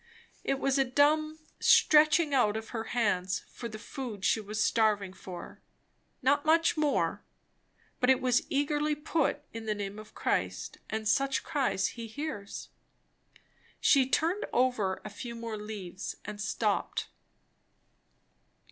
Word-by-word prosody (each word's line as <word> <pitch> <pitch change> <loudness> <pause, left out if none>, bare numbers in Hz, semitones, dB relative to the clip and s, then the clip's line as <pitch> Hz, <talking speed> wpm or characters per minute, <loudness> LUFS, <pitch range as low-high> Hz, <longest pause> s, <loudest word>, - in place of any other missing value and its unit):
It 275 - 0
was 275 0 +1
a - - +6
dumb 305 +4 +2 0.2
stretching 305 0 +5
out 220 -5 +3
of 220 0 -7
her 225 -2 -4
hands 190 -6 0
for 235 - -6
the 215 - -7
food 215 -3 -6
she - - +3
was 215 +1 -5
starving 210 -4 +2
for; 180 -2 -9 0.6
not 285 +2 +3
much 325 +1 +4
more; 300 -2 +1 0.8
but 250 - +2
it 265 - +5
was 250 -1 +1
eagerly 295 +1 +1
put 300 0 0
in 225 -1 -7
the 215 - 0
name 205 0 -5
of 215 0 -13
Christ, - - -2
and 220 0 -2
such 270 +5 +2
cries 260 -12 0
he 230 -1 -7
hears. 220 -4 -6 1.1
She 265 -2 +4
turned 340 +9 +1
over 240 -7 +1
a - - -4
few 235 +3 -7
more 230 -1 -5
leaves 210 -3 -6
and 210 0 -6
stopped. 210 - -1
240 Hz, 140 wpm, -30 LUFS, 210-285 Hz, 1.1 s, a